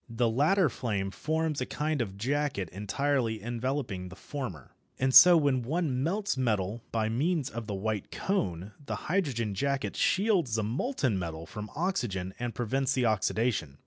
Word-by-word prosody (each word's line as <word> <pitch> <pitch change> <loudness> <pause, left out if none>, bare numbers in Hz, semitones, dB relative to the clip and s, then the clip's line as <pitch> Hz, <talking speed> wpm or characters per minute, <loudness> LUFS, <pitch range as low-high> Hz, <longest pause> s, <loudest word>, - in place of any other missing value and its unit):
The 115 0 +1
latter 160 - +3
flame 100 -6 -2
forms 155 +2 -1
a 130 - -2
kind 150 -2 -1
of 100 -4 -4
jacket 135 -3 -1
entirely 115 +3 -1
enveloping 120 -4 -3
the 95 - -10
former. 105 - -6 0.3
And 130 0 +1
so 175 +3 +10
when 140 -5 +2
one 140 0 -1
melts 200 +6 0
metal 110 -3 0
by 110 -1 0
means 145 +6 0
of 115 -1 -6
the 105 - -3
white 105 0 -2
cone 95 - -2
the - - -3
hydrogen 135 - 0
jacket 140 +5 -1
shields 190 - +2
the 110 - 0
molten 125 - 0
metal 80 -2 -5
from 105 +5 -7
oxygen 115 - -1
and 120 -1 -3
prevents 135 +3 0
the 125 -2 +1
oxidation. 110 - 0
120 Hz, 160 wpm, -29 LUFS, 105-145 Hz, 0.3 s, so